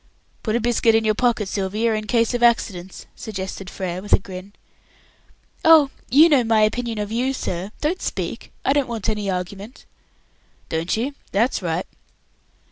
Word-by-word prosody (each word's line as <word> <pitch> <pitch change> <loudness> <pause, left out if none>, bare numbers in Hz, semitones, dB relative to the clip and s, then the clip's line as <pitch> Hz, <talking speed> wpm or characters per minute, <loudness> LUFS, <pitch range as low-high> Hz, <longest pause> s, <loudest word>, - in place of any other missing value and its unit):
"Put 220 -1 -1
a - - +2
biscuit 235 -1 +3
in 225 0 +2
your 215 - +3
pocket, 235 -2 +1
Sylvia, 210 +4 0
in 215 0 -3
case 230 +2 +2
of 240 - -1
accidents," 190 -6 +1
suggested 190 -2 -6
Frere, 185 -2 -4
with 205 - -2
a - - +9
grin. 190 0 -10 1.1
"Oh! 315 -4 +7 0.2
you 300 +6 +7
know 285 -6 +4
my 225 -1 +3
opinion 230 +1 0
of 210 0 -3
you, 250 +4 0
sir. 185 -6 -4
Don't 335 +5 -1
speak; - - -4
I 270 - +4
don't 285 -2 +1
want 225 -4 -3
any 210 -2 -1
argument". 195 +6 -5 0.8
"Don't 165 +5 -1
you? 260 +6 -2 0.2
that's 230 +5 +1
right." 170 0 -2
220 Hz, 165 wpm, -22 LUFS, 195-240 Hz, 1.1 s, a